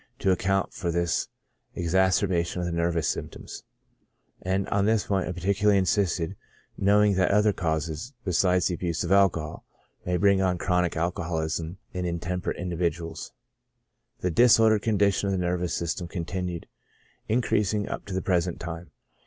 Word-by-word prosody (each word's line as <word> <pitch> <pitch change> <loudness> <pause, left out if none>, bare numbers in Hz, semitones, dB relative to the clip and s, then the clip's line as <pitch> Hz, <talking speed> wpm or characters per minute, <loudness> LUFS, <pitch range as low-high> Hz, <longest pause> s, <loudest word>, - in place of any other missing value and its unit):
to 95 - +1
account 95 +1 0
for 85 - -3
this 85 0 0 0.5
exacerbation 90 0 +1
of 90 - -2
the 85 - -2
nervous 85 -2 0
symptoms - - -5 0.8
j 90 - -5
and 95 +1 0
on 100 0 +1
this 110 -2 +2
point 95 -2 0
I - - -1
particularly 100 +3 +2
insisted, 95 -2 0 0.4
knowing 100 +1 +4
that 95 -1 +3
other 105 +1 +3
causes, 80 - -2
besides 90 0 +2
the 90 - +1
abuse 85 -1 -2
of 85 - -3
alcohol, 90 -6 +2 0.4
may 90 0 0
bring 100 0 +3
on 90 -1 +1
chronic 90 -1 0
al 85 +2 +1
coholism 80 0 -3 0.2
in 90 -1 -3
intemperate 90 +1 -3
individuals. 85 -2 -3 0.9
The 90 - 0
disordered 110 +1 +5
con 110 -2 0
dition 100 0 +2
of 100 - 0
the - - 0
nervous 90 -1 -1
system 85 +1 -3
continued 90 0 -4 0.6
increasing 105 -3 +1
up - - -5
to 95 - -4
the 95 - -2
present 90 -2 0
time. 85 0 -7
90 Hz, 155 wpm, -26 LUFS, 85-100 Hz, 0.9 s, disordered